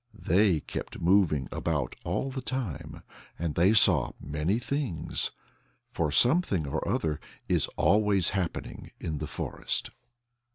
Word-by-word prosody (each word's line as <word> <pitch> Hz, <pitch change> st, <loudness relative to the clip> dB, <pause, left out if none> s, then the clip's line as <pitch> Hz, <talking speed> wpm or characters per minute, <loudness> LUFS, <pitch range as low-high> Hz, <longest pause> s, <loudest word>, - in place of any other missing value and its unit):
They 90 Hz, -3 st, +3 dB
kept -, -, -6 dB
moving 85 Hz, -7 st, +3 dB
about 75 Hz, -6 st, -1 dB
all 135 Hz, -, -1 dB
the 130 Hz, 0 st, -4 dB
time. 125 Hz, -, -4 dB, 0.3 s
And 85 Hz, -2 st, -2 dB
they 90 Hz, +6 st, +4 dB
saw 110 Hz, -, +4 dB
many 75 Hz, +8 st, -1 dB
things, 125 Hz, -, -1 dB, 0.6 s
for 75 Hz, -3 st, 0 dB
something 120 Hz, -, +3 dB
or 70 Hz, -, -3 dB
other 80 Hz, -1 st, 0 dB, 0.3 s
is -, -, +2 dB
always 100 Hz, +1 st, +3 dB
happening 95 Hz, -4 st, -3 dB
in 75 Hz, -3 st, -3 dB
the 75 Hz, -, -3 dB
forest. -, -, -3 dB
85 Hz, 125 wpm, -29 LUFS, 75-105 Hz, 0.6 s, they